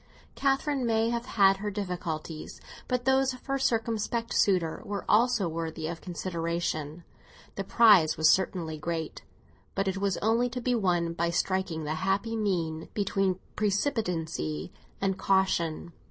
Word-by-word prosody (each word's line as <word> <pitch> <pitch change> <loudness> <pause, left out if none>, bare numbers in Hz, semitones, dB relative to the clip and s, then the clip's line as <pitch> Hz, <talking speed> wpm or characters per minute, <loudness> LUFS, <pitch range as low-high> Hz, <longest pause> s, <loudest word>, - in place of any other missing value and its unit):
Catherine 275 0 0
may 225 0 +2
have 235 +1 -3
had 195 -5 +4
her 210 +1 -3
difficulties; 175 -6 -5 0.3
but 250 -1 -1
those 265 0 +3
of 255 - -16
her 275 0 -1
circumspect 230 -1 -1
suitor 180 -5 +2
are 200 -1 -4
also 225 -3 +3
worthy 160 -1 -4
of 165 +1 -4
consideration. 170 -3 -3 0.5
The 195 - -4
prize 195 -6 +5
was 160 0 +6
certainly 170 -4 0
great; 160 0 -4 0.5
but 195 0 0
it 190 0 -1
was 195 -1 0
only 230 +3 +2
to 250 +1 -4
be 250 +1 0
won 175 -6 +1
by 170 0 0
striking 180 -2 -1
the 150 +1 -2
happy 195 +4 0
mean 170 -7 -1
between 195 -2 +1 0.2
precipitancy 175 - -1 0.3
and 195 -1 -1
caution. 175 -4 +1
190 Hz, 140 wpm, -28 LUFS, 165-225 Hz, 0.5 s, was